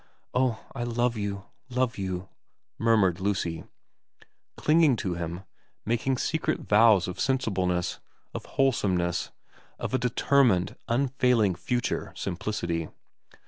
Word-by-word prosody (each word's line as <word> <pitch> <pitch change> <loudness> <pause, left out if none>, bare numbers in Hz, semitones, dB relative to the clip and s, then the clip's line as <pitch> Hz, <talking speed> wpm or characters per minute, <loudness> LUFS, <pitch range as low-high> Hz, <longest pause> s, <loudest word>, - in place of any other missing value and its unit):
' - - -42
Oh, 125 -3 0
I - - -5
love 120 0 0
you, 100 -2 -4 0.2
love 125 -3 0
you 95 -1 -3 0.3
' - - -56
murmured 105 -6 +3
Lucy, 95 -4 -1 0.9
clinging 155 -3 +4
to 95 -5 -2
him, 85 +2 -5 0.4
making 120 +4 0
secret 160 +5 -1
vows 105 -3 +5
of 90 - -6
sensibleness, 95 -9 0 0.3
of - - -6
wholesomeness, 95 -10 +1 0.5
of - - -4
a 130 - +2
determined, 125 -5 +2
unfailing 125 -4 +2
future 120 +7 -2
simplicity. 85 -3 -3
110 Hz, 115 wpm, -27 LUFS, 90-125 Hz, 0.9 s, vows